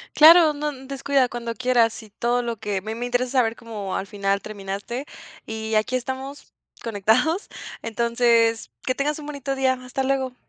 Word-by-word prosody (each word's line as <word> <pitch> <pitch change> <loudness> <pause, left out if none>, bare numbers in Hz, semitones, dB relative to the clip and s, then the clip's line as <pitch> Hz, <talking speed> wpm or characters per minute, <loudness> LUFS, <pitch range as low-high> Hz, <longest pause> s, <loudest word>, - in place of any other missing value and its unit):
Claro, 320 0 +8
no 295 0 -2
n 265 -1 -12
descuida 275 -1 +1
cuando 235 -1 -4
quieras, 240 -2 +2
y 215 - -15
todo 240 +3 0
lo 235 -1 -3
que 205 -2 -2
a - - -5
mí 220 +1 -4
me 240 +1 -4
interesa 245 0 0
saber 230 -2 +2
cómo 215 -5 -5
al 195 - -3
final 200 -1 -1
terminaste. 205 +6 -5 0.4
Y 220 0 -4
aquí 215 +4 +1
estamos 265 +3 -6 0.3
conectados, 230 - +1 0.3
entonces, 230 0 +2 0.2
que 255 - +1
tengas 295 +3 -1
un 295 - -8
bonito 280 -2 -3
día. 265 -1 +2
Hasta 255 +2 -3
luego. 265 -1 0
245 Hz, 175 wpm, -23 LUFS, 220-270 Hz, 0.4 s, Claro